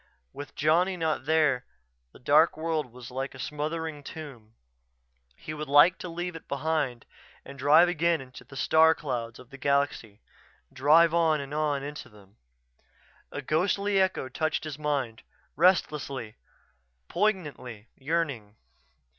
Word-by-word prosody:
With 145 - -9
Johnny 175 +5 +2
not 160 -5 -1
there 150 -5 +2 0.5
the - - -16
dark 150 +6 +3
world 155 -5 -2
was 125 0 -11
like 135 +1 -4
a - - -10
smothering 150 +1 -4
tomb. 130 -9 -10 0.8
He 155 - -8
would 155 0 -6
like 145 +6 +6
to 180 - -6
leave 175 +1 -5
it 165 - -11
behind 140 -4 -2 0.4
and 140 - -10
drive 150 +6 +6
again 170 -1 +1
into 130 -1 -12
the 140 - -14
star 160 +3 +4
clouds 120 -6 -4
of 125 - -15
the 140 - -11
galaxy; 140 -7 -1 0.5
drive 155 +5 +5
on 165 -2 +3
and 140 0 -7
on 150 -2 0
into 150 +1 -7
them 105 0 -20 0.9
A 145 - -6
ghostly 195 +6 +1
echo 190 -8 0
touched 155 +5 -2
his 155 -2 -6
mind; 140 -7 -2 0.3
restless, 165 -3 +2 1.0
poignantly 145 - -2
yearning. 140 -8 -3
150 Hz, 140 wpm, -27 LUFS, 130-160 Hz, 1.0 s, like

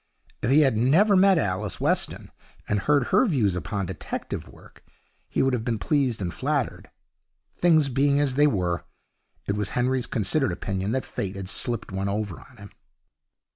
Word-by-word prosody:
If - - -1
he 145 +4 +6
had 135 -6 +3
never 165 - +4
met 190 0 +5
Alice 95 - -2
Weston, - - -1 0.4
and 105 - +1
heard 140 +2 +1
her - - +4
views 115 - +1
upon 90 +4 -3
detective - - -6
work, - - -17 0.5
he - - +1
would 135 -1 +1
have 120 -3 -1
been 115 -1 -1
pleased 130 -4 0
and 85 - -3
flattered. 140 -2 -2 0.7
Things 160 -4 +4
being 140 +2 +2
as 145 -3 +1
they 145 +3 +4
were, 90 -8 -1 0.6
it 100 - 0
was 105 -1 -2
Henry's 125 0 +1
considered 125 +6 0
opinion 100 +1 -3
that 130 - -1
Fate 100 -1 -5
had 100 -1 -6
slipped 115 +1 0
one 95 +1 -2
over 100 -3 -3
on 125 - -18
him. 100 -1 -12
120 Hz, 175 wpm, -25 LUFS, 100-140 Hz, 0.7 s, he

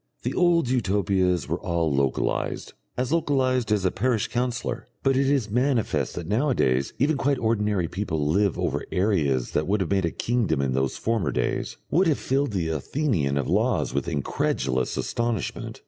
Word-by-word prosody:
The - - -1
old 175 -5 +3
Utopias 95 - +1
were 85 +3 -2
all 85 -4 0
localised, 70 -1 -1 0.2
as 125 +2 -1
localised 130 -7 +1
as 105 -3 +2
a 95 - +3
parish 115 -1 0
councillor; 120 -1 -2 0.2
but 135 -1 +3
it 135 +1 +2
is 130 -7 +1
manifest 125 -1 0
that 90 - -5
nowadays 105 - +1
even 145 +2 +2
quite 140 0 +1
ordinary 105 -6 0
people 85 -5 -2
live 95 +5 +2
over - - -1
areas 80 - +1
that 75 - 0
would 105 +3 +1
have 95 -2 -2
made 95 -2 +2
a - - +1
kingdom 115 - 0
in 70 -2 0
those 65 0 0
former 110 -9 0
days, 65 +1 -2
would 185 +2 +4
have 155 - +2
filled 135 0 0
the 85 -4 -1
Athenian 80 - 0
of 70 - 0
the - - -3
Laws - - +1
with 70 +2 -1
incredulous 65 -4 -1
astonishment. 115 -3 -3
105 Hz, 175 wpm, -25 LUFS, 80-125 Hz, 0.2 s, would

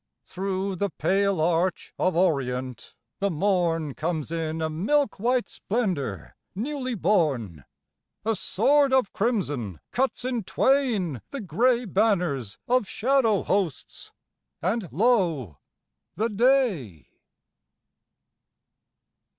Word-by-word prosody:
Through 190 0 -3
the 200 +3 0
pale 195 +3 +1
arch 170 +3 0
of 185 - +1
orient 130 - -1 0.2
the 200 - +1
morn 165 -4 0
Comes 160 0 -3
in 160 -1 -2
a 160 - 0
milk 210 - 0
white 245 +3 +1
splendor 170 - -3 0.2
newly 255 +3 -3
born, 140 - 0 0.6
A 225 0 +1
sword 270 +9 +2
of 260 -6 +2
crimson 145 - -1
cuts 255 -1 0
in 245 -3 -1
twain 215 - +1
the 280 - -5
gray 240 +4 +1
Banners 180 - 0
of 250 -4 +2
shadow 230 -3 +2
hosts, 185 -9 -2 0.5
and 190 0 -1
lo, 170 - +1 0.6
the 225 +2 0
day 205 - +1
190 Hz, 100 wpm, -25 LUFS, 155-235 Hz, 0.6 s, sword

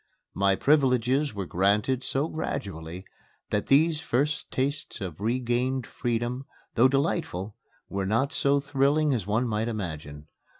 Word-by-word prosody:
My 100 0 +3
privileges 135 0 +2
were 100 -2 -3
granted 105 +9 +1
so 140 +3 0
gradually 95 - -5 0.5
that 105 - 0
these 155 +3 +4
first 150 0 0
tastes 140 +1 -2
of 90 -3 -6
regained 125 +2 0
freedom, 120 +2 -2 0.3
though 120 +3 +6
delightful, 135 - -1 0.3
were 95 -1 -2
not 125 +9 +1
so 140 0 +3
thrilling 140 +1 +2
as 110 -7 -2
one 115 +4 +1
might 110 0 -1
imagine. 80 -9 -5
120 Hz, 130 wpm, -27 LUFS, 100-140 Hz, 0.5 s, though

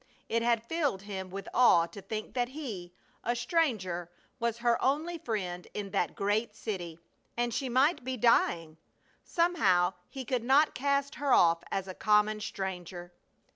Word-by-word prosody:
It 230 - +1
had 235 -1 +1
filled 285 - -1
him 190 -2 -6
with 195 +2 -7
awe 230 -9 +6
to 200 +4 -10
think 215 +3 -5
that 245 -1 0
he, 225 - -6 0.3
a 240 - 0
stranger, 225 - 0 0.3
was 235 -1 -1
her 235 0 +1
only 315 +6 0
friend 185 - -4
in 200 -2 -4
that 175 - 0
great 210 +2 0
city, 180 -8 -5 0.4
and 240 -1 0
she 265 +2 -2
might 270 +7 +3
be 260 0 -3
dying! 165 -8 +2 0.4
Somehow 200 - +2 0.2
he 265 -1 -7
could 250 -3 -1
not 275 +5 +4
cast 280 +1 0
her 285 -2 +1
off 165 -1 +5
as 195 -1 -2
a 185 - -5
common 210 +1 +2
stranger. 180 -3 -5
220 Hz, 160 wpm, -30 LUFS, 190-260 Hz, 0.4 s, awe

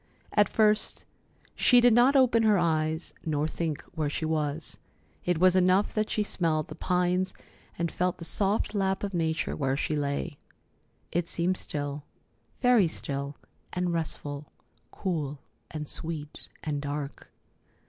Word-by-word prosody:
At 205 -2 +4
first 215 -1 +2 0.5
she 245 - +5
did 240 -1 +6
not 245 +4 +5
open 250 -4 +5
her 215 -2 +5
eyes, 160 -1 0
nor 150 -1 0
think 160 -2 -3
where 155 -2 -1
she 160 - -2
was. 155 -1 -2 0.5
It 180 -1 +2
was 185 +2 +5
enough 185 +2 +4
that 215 0 0
she 215 - +1
smelled 160 -6 0
the - - -6
pines 180 +1 0 0.4
and 170 -1 -1
felt 180 0 0
the 165 - -7
soft 200 +5 +1
lap 195 -1 0
of 200 -1 -2
nature 160 -2 0
where 135 -2 0
she 155 - -1
lay. 145 +1 -2 0.7
It 175 0 0
seemed 175 +2 0
still, 145 -1 -4 0.6
very 245 -7 +6
still 140 -2 -4 0.4
and 180 -1 0
restful; 150 -3 -3 0.4
cool 155 -7 -3 0.3
and 150 -1 -5
sweet 155 -2 -6
and 145 -2 -2
dark. 145 0 -5
165 Hz, 145 wpm, -28 LUFS, 150-190 Hz, 0.7 s, did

